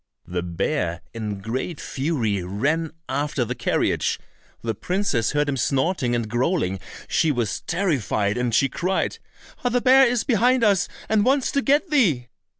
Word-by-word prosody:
The 90 0 -3
bear 85 - -2
in 105 -4 -4
great 130 - -3
fury 130 - -1
ran 145 - -1 0.2
after 140 -1 -1
the - - -3
carriage. - - 0 0.5
The 115 -1 -1
princess 165 - 0
heard 145 0 +1
him 140 -1 -1
snorting 130 0 +1
and 115 -2 -1
growling; 120 - 0 0.3
she 160 -2 +2
was 120 -6 -1
terrified, 135 - 0
and 125 -1 0
she 125 +5 +3
cried, 180 +8 -1 0.4
"Ah, 245 - +2
the 245 +1 +2
bear 260 +2 +6
is 240 -1 +1
behind 250 0 +3
us 200 -4 +3 0.2
and 220 -1 +3
wants 270 +2 +2
to 280 - +1
get 290 +5 +2
thee!" 160 - +2
145 Hz, 155 wpm, -23 LUFS, -, 0.5 s, bear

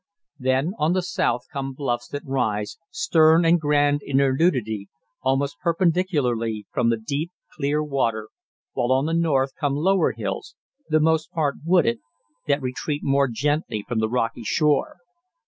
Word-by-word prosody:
Then 130 +5 +1
on 155 +3 +2
the 185 -1 0
south 120 -8 -1
come 135 -1 -3
bluffs 120 -3 -2
that 145 - -6
rise, 110 -6 -2
stern 170 - +4
and 165 0 +4
grand 145 -1 +2
in 135 - -1
their 135 -1 +3
nudity, 110 - 0 0.3
almost 135 -4 0
perpendicularly 155 - 0
from 120 -1 +1
the 115 - +2
deep, 145 +9 -3 0.2
clear 150 +1 0
water, 115 -7 -1 0.4
while 120 +1 0
on 135 +2 +3
the 165 - -1
north 145 -5 +2
come 140 -1 0
lower 185 +6 +2
hills, - - -5 0.3
the 155 0 +3
most 160 0 +1
part 150 -4 -1
wooded, 165 -9 +3 0.5
that 140 -1 +1
retreat 145 +3 -3
more 140 0 +3
gently 135 -3 -1
from 120 -2 -1
the 110 0 0
rocky 115 -1 -1
shore. 145 - +1
140 Hz, 155 wpm, -23 LUFS, 120-155 Hz, 0.5 s, stern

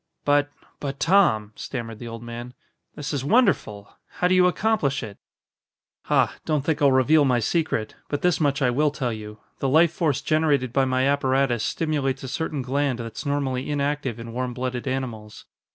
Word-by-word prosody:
"But 145 0 +3 0.3
but, 140 -1 -5
Tom," 160 - +3
stammered 115 -4 -6
the 120 - -7
old 115 0 -7
man, 120 +1 -8 0.4
"this 145 0 -5
is 140 -3 -2
wonderful. 145 - +1 0.2
How 180 - +1
do 185 - +2
you 180 0 +5
accomplish 180 - 0
it?" 105 -3 -9 0.9
"Ha! - - +2
Don't 150 -3 -1
think 160 -1 0
I'll 140 -1 +5
reveal 140 +4 +4
my 130 -3 +3
secret. 120 -4 -1 0.2
But 145 - -3
this 180 -3 +3
much 145 -3 +1
I 125 - +3
will 150 +4 +2
tell 130 -5 -3
you: 105 -1 -8 0.2
the 135 - 0
life 160 +4 +4
force 150 -5 0
generated 145 -5 +1
by 135 0 +3
my 130 0 +1
apparatus 135 -4 +1
stimulates 145 -5 -1
a - - -5
certain 150 0 -3
gland 135 0 0
that's 115 +5 -6
normally 135 -2 -1
inactive 145 -4 -1
in 115 0 -8
warm 125 0 -3
blooded 125 0 -3
animals. 120 -5 -5
135 Hz, 180 wpm, -24 LUFS, 120-150 Hz, 0.9 s, you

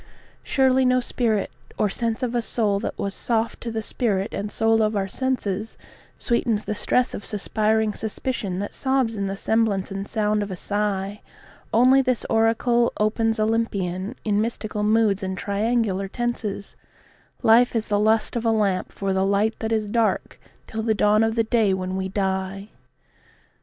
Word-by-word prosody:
Surely 265 -1 +3
no 255 0 +4
spirit 230 -4 -1 0.3
or 210 - +2
sense 230 +4 -2
of 245 -1 -1
a 240 - +1
soul 215 -3 0
that 225 - -4
was 200 -1 -2
soft 230 0 -1
to 235 - -4
the 225 -1 -3
spirit 205 -4 -1
and 205 +1 -3
soul 225 0 +2
of 215 0 +1
our 195 -1 0
senses 220 -3 -2 0.4
Sweetens 235 -3 0
the - - -2
stress 250 +4 +1
of - - -6
suspiring 215 +1 0
suspicion 220 -3 -3
that 205 +2 -4
sobs 260 -4 0
in 200 -1 -2
the 195 - -3
semblance 210 -2 0
and 195 +1 -4
sound 210 -1 0
of 205 - -3
a 185 - -4
sigh; 205 +1 -2 0.5
Only 255 +4 +5
this 255 -3 0
oracle 235 +2 +3
opens 220 +1 +1
Olympian, 210 -2 -1
in 210 -1 +2
mystical 215 -2 -3
moods 210 -1 +2
and 190 -1 -3
triangular 200 -1 0
tenses 215 -3 -3 0.7
"Life 235 +2 +5
is 225 -1 0
the 205 -1 0
lust 220 +3 +2
of 235 - -1
a 230 - +2
lamp 205 -4 +1
for 195 -1 -2
the 190 0 +1
light 200 +3 +2
that 220 0 -3
is 215 -2 0
dark 225 +1 0 0.3
till 220 - -4
the 220 -1 +1
dawn 210 +1 +4
of 225 0 0
the 225 - +3
day 220 -4 +2
when 185 0 -3
we 190 0 -2
die." 190 +1 -2
215 Hz, 175 wpm, -23 LUFS, 200-230 Hz, 0.7 s, Only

